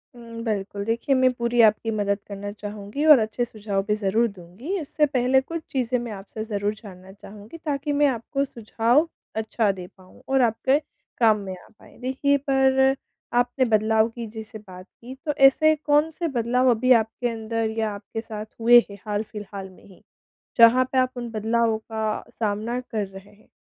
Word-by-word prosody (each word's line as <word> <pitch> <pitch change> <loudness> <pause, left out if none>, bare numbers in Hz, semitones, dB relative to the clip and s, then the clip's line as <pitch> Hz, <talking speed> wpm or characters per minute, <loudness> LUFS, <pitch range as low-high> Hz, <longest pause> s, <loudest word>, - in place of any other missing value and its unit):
हुँ, 230 -1 -9
बिल्कुल, 200 -2 -3
देखिए 235 +4 0
मैं 255 0 +4
पूरी 235 0 -1
आपकी 220 +1 +3
मदद 200 -1 0
करना 205 0 -6
चाहूँगी 210 +5 -6
और 300 -4 +9
अच्छे 220 +2 -1
सुझाव 205 -3 -3
भी 210 - +2
ज़रूर 215 +3 +1
दूँगी। 205 - -6
उससे 300 +1 +1
पहले 265 -1 +2
कुछ 330 +4 -6
चीज़ें 255 -2 0
मैं 235 -1 -6
आपसे 210 +2 -7
ज़रूर 205 -1 -2
जानना 190 -3 -13
चाहूँगी 205 +7 -12
ताकि 290 -2 -3
मैं 290 0 +4
आपको 270 +3 -1
सुझाव 235 +5 +1 0.3
अच्छा 220 -1 0
दे 185 -2 -8
पाऊँ 185 -1 -19
और 265 -1 +2
आपके 255 +5 +2 0.4
काम 220 -3 +5
में 190 -2 -6
आ - - -19
पाएँ। - - -18
देखिए, 270 +3 +1
पर 265 -1 +3 0.4
आपने 245 +2 +2
बदलाव 220 0 +2
की 235 0 -7
जैसे 220 +1 -9
बात 185 -2 -12 0.2
की, 255 +3 -9
तो 300 - 0
ऐसे 310 +4 +5
कौन-से 305 +3 +1
बदलाव 250 -1 +1
अभी 255 +3 +1
आपके 225 +2 -4
अंदर 225 0 -2
या 220 -1 0
आपके 205 +2 -6
साथ 215 -2 -7
हुए 240 +1 +8
हैं, 200 - -10
हाल-फिलहाल 205 -2 -5
में 185 - -19
ही, 190 - -18 0.5
जहाँ 235 +2 +7
पे 265 - 0
आप 255 0 +3
उन 240 -1 -5
बदलावों 225 +1 +1
का 220 -1 -3 0.2
सामना 220 +4 -1
कर 220 -4 -3
रहे 195 +1 -13
हैं? 210 +1 -25
225 Hz, 180 wpm, -24 LUFS, 210-255 Hz, 0.5 s, और